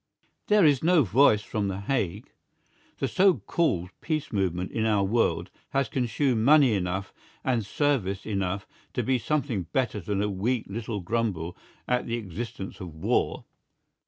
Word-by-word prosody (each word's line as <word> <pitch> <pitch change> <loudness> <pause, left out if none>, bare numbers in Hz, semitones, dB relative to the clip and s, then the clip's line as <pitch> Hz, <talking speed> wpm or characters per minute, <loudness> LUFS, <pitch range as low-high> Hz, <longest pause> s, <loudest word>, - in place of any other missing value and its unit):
There 210 -4 +5
is 145 -4 +4
no 170 -2 +5
voice 110 0 +4
from 105 -2 -2
The 95 0 -3
Hague. 100 -3 -2 0.7
The - - -1
so 190 -1 +4
called 95 - -1
peace 155 -6 -2
movement 90 -3 -1
in 110 - -1
our 105 -3 +2
world 115 +4 +1 0.2
has 135 0 +1
consumed 125 -1 0
money 140 -2 +6
enough 95 0 -2 0.3
and 120 -4 +1
service 100 -5 0
enough 100 -2 -2 0.3
to - - -1
be 130 -1 +1
something 125 - -1
better 125 -3 0
than 100 +2 -1
a - - +1
weak 110 +5 -1
little 105 0 -4
grumble 90 -5 -2 0.3
at 125 0 0
the 115 - -1
existence 110 0 -6
of 90 -4 -8
war. 80 - 0
110 Hz, 155 wpm, -27 LUFS, 95-130 Hz, 0.7 s, money